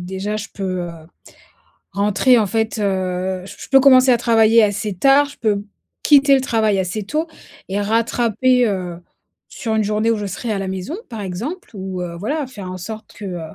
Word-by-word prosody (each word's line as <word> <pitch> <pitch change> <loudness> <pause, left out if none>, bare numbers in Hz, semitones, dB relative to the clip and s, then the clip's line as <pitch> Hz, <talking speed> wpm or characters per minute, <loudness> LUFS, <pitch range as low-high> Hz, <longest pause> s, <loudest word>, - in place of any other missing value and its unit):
déjà 205 +3 -3
je 215 0 -5
peux, 185 -2 -3
heu, 175 -1 -5 1.0
rentrer 210 +5 +3
en 210 - +2
fait, 220 +2 -1
heu, 185 -2 -1
j 200 - -10
p - - -12
je - - -13
peux 270 0 +6
commencer 260 -1 +6
à - - +5
travailler 225 -1 +4
assez 205 0 -1
tard, 275 +8 +4
je 285 - -14
peux 205 -2 0 0.4
quitter 280 -1 +6
le 265 - +3
travail 220 -5 +1
assez 190 +3 -2
tôt 305 +9 -2 0.4
et 200 +2 -1
rattraper, 230 +3 +2
heu, 180 -3 -4 0.5
sur 220 -3 -4
une 220 - +2
journée 215 +2 0
où - - 0
je 205 -1 -4
serai 215 +4 -4
à 200 - -2
la 195 -1 -3
maison 190 - -4
par 225 -3 -7
exemple 220 - -5
ou, 190 -1 -5
heu, 170 -1 -6
voilà, 285 - -2
faire 200 -8 -8
en 185 - -6
sorte 220 +4 -8
que, 210 - -10
heu, 180 -3 -5
215 Hz, 205 wpm, -19 LUFS, 190-240 Hz, 1.0 s, peux